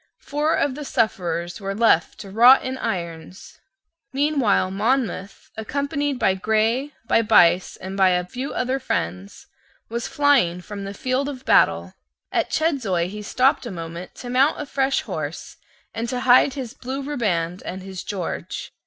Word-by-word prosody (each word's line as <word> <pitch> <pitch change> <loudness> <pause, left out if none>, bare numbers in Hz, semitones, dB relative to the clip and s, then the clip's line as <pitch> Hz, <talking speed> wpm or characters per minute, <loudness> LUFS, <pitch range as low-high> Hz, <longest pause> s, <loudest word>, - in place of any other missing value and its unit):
Four 300 +2 -1
of 285 - 0
the 295 +3 -6
sufferers 175 - -1
were 195 0 -3
left 210 -7 +3
to 195 - -10
rot 240 +6 +7
in 260 0 -3
irons. 170 0 -5 0.5
Meanwhile 270 -9 +1
Monmouth, 210 -2 -2
accompanied 280 +5 -2
by 190 - +2
Grey, 220 +8 0
by 230 - +3
Buyse, 180 -4 +4
and 190 +1 -7
by 190 -1 +4
a 180 -1 +1
few 255 +9 -5
other 255 +2 -1
friends, 90 - -4 0.4
was 235 +1 -3
flying 275 -12 +3
from 200 +1 -7
the 200 +1 -6
field 255 +5 -1
of 265 -2 -8
battle. 85 +2 +3 0.4
At - - 0
Chedzoy 225 - 0
he 210 +2 -7
stopped 250 +4 +1
a - - -5
moment 170 0 -7
to 245 - -7
mount 270 +4 +3
a 300 - -4
fresh 270 -1 0
horse - - -6 0.4
and 230 +1 -3
to 250 0 -2
hide 255 +2 +5
his 255 -4 -5
blue 270 +1 -5
riband 190 - -1
and 185 +1 -6
his 190 -1 -7
George. 190 -5 -5
220 Hz, 160 wpm, -22 LUFS, 185-265 Hz, 0.5 s, rot